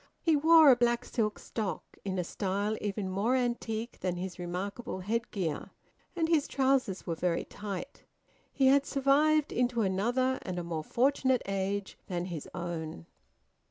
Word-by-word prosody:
He 325 -2 +4
wore 315 0 +7
a - - +7
black 240 0 +1
silk 215 -3 -1
stock, 215 -4 -5
in 190 -1 -3
a 180 - 0
style 200 +4 -1
even 205 -1 -2
more 200 +7 +1
antique 235 -2 -2
than 180 -1 -1
his 180 0 -5
remarkable 190 +4 -4
headgear, 200 -6 -2 0.5
and 330 -2 +1
his 320 -3 +2
trousers 265 -8 +1
were 170 - -1
very 170 +1 0
tight. 210 +7 -7 0.5
He 270 - +1
had 275 +1 +5
survived 290 +2 +3
into 245 -2 +1
another 240 +7 +1
and 185 -1 -5
a 175 - -2
more 165 -2 -3
fortunate 260 - +2
age 195 0 -2
than 175 -1 -2
his 170 -5 -6
own. 165 - -5
215 Hz, 155 wpm, -30 LUFS, 185-260 Hz, 0.5 s, wore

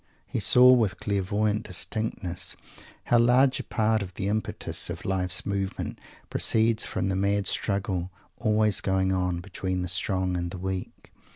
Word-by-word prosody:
He - - -3
saw, 125 +1 +7
with 110 -6 +2
clairvoyant 105 +2 0
distinctness, 90 -2 -3 0.5
how 120 - +3
large 125 +3 +4
a - - -4
part 110 -1 +1
of 95 -2 -7
the 95 - -2
impetus 110 +1 -2
of - - -6
life's 95 -1 0
movement 100 -1 -3 0.3
proceeds 110 0 +2
from - - -2
the 95 - 0
mad 100 +1 +1
struggle, 95 -4 -1 0.3
always 105 -2 +2
going 95 -1 +1
on, 90 -2 -1
between 95 -1 -3
the - - -3
strong 95 0 0
and 85 0 -2
the 90 - -7
weak. 95 0 -6
100 Hz, 155 wpm, -26 LUFS, 95-110 Hz, 0.5 s, saw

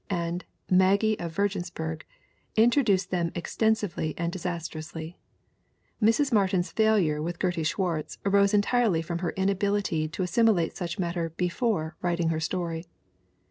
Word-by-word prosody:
and 175 -1 -2 0.2
Maggie 200 +4 +3
of 170 -1 -4
Virginsburg, 175 -4 -2 0.5
introduce 225 -5 +4
them 175 -3 -1
ex 175 - -5
tensively 215 -8 0
and 170 0 -1
disastrously. 165 -2 -5 0.8
Mrs. 230 +6 +3
Martin's 190 -4 +2
failure 205 -9 +2
with 170 +2 -3
Gertie 175 -3 0
Swartz 165 -1 -1
arose 200 0 +4
entirely 210 -4 +2
from 170 +1 -3
her 175 -1 -1
inability 195 -4 +1
to 165 +4 -3
as 180 - -3
similate 215 -7 +3
such 170 -2 -4
matter 170 -2 -2
before 175 -1 -1
writing 175 -2 0
her 160 -1 0
story. 165 0 -3
180 Hz, 135 wpm, -27 LUFS, 165-200 Hz, 0.8 s, introduce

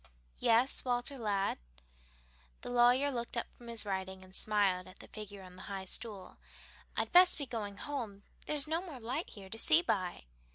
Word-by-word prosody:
"Yes, 235 +4 +4
Walter, 250 +2 -1
lad?" 200 -3 0 1.0
The - - -6
lawyer 245 +4 +5
looked 235 -1 -4
up 235 - 0
from 240 - -14
his 230 -2 +2
writing, 190 -1 -4
and 185 0 -16
smiled 200 -4 +2
at 185 - -13
the - - -13
figure 205 -2 -9
on 180 -1 -12
the - - -10
high 195 -1 -4
stool. 200 -1 -4 0.6
"I'd - - 0
best 360 0 +8
be 285 - -3
going 210 -5 -5
home; 230 -9 -5 0.2
there's 300 -1 +4
no 325 +2 0
more 325 -8 -8
light 250 +8 -3
here 195 -2 -11
to 225 - -3
see 325 +6 +5
by." 185 - -1
225 Hz, 180 wpm, -33 LUFS, 195-260 Hz, 1.0 s, best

